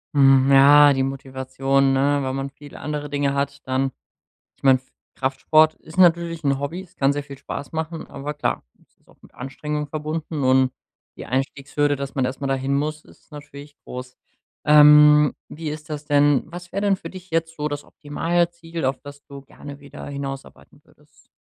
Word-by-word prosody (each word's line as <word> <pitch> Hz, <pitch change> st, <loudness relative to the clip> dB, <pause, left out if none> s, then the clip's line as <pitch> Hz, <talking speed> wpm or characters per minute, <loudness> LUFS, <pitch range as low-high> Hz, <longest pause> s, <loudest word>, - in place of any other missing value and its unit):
Mhm, 135 Hz, -1 st, +5 dB
ja, 145 Hz, +1 st, +7 dB
die 135 Hz, 0 st, 0 dB
Motivation, 135 Hz, 0 st, -1 dB
ne, 140 Hz, +2 st, +2 dB
wenn 130 Hz, 0 st, -2 dB
man 135 Hz, 0 st, -4 dB
viele 145 Hz, +1 st, -13 dB
andere 150 Hz, -1 st, -4 dB
Dinge 140 Hz, -1 st, 0 dB
hat, 140 Hz, -1 st, -3 dB
dann 130 Hz, +1 st, 0 dB, 0.6 s
ich -, -, -36 dB
mein, 130 Hz, -2 st, +5 dB, 0.3 s
Kraftsport 155 Hz, +4 st, +2 dB
ist 165 Hz, +3 st, -9 dB
natürlich 170 Hz, -2 st, +3 dB
'n 140 Hz, -1 st, +1 dB
Hobby, 160 Hz, +6 st, -4 dB
es 180 Hz, -1 st, -17 dB
kann 135 Hz, 0 st, +2 dB
sehr 145 Hz, -, -3 dB
viel 140 Hz, -1 st, -11 dB
Spaß 140 Hz, +2 st, -7 dB
machen, 160 Hz, 0 st, -4 dB
aber 145 Hz, +2 st, -6 dB
klar, -, -, -2 dB, 0.2 s
es -, -, -32 dB
ist -, -, -38 dB
auch -, -, -24 dB
mit -, -, -20 dB
Anstrengung 150 Hz, +3 st, -4 dB
verbunden, 155 Hz, 0 st, -4 dB
und 130 Hz, 0 st, +3 dB, 0.4 s
die -, -, -9 dB
Einstiegshürde, 140 Hz, +2 st, -1 dB
dass 140 Hz, 0 st, -6 dB
man 130 Hz, -, +1 dB
erst 130 Hz, +2 st, -5 dB
mal 140 Hz, -, -2 dB
dahin 135 Hz, 0 st, -1 dB
muss, 150 Hz, +2 st, -2 dB
ist -, -, -22 dB
natürlich 145 Hz, 0 st, -11 dB
groß. 125 Hz, 0 st, -9 dB, 0.5 s
Ähm, 150 Hz, 0 st, +7 dB
wie 160 Hz, 0 st, -6 dB
ist 155 Hz, +1 st, -8 dB
das 150 Hz, 0 st, -6 dB
denn, 145 Hz, -2 st, +3 dB
was 175 Hz, +2 st, -10 dB
wär' 195 Hz, -, -2 dB
denn 200 Hz, -1 st, +2 dB
für -, -, -10 dB
dich 185 Hz, -1 st, -12 dB
jetzt 165 Hz, 0 st, -1 dB
so 150 Hz, 0 st, -2 dB
das 145 Hz, -1 st, -5 dB
Optimalziel, 170 Hz, +1 st, -3 dB
auf 130 Hz, 0 st, -1 dB
das 145 Hz, 0 st, -12 dB
du 140 Hz, -1 st, -11 dB
gerne 140 Hz, +1 st, -12 dB
wieder 140 Hz, 0 st, -11 dB
hinausarbeiten 135 Hz, -1 st, -8 dB
würdest? -, -, -27 dB
145 Hz, 185 wpm, -22 LUFS, 135-155 Hz, 0.6 s, ja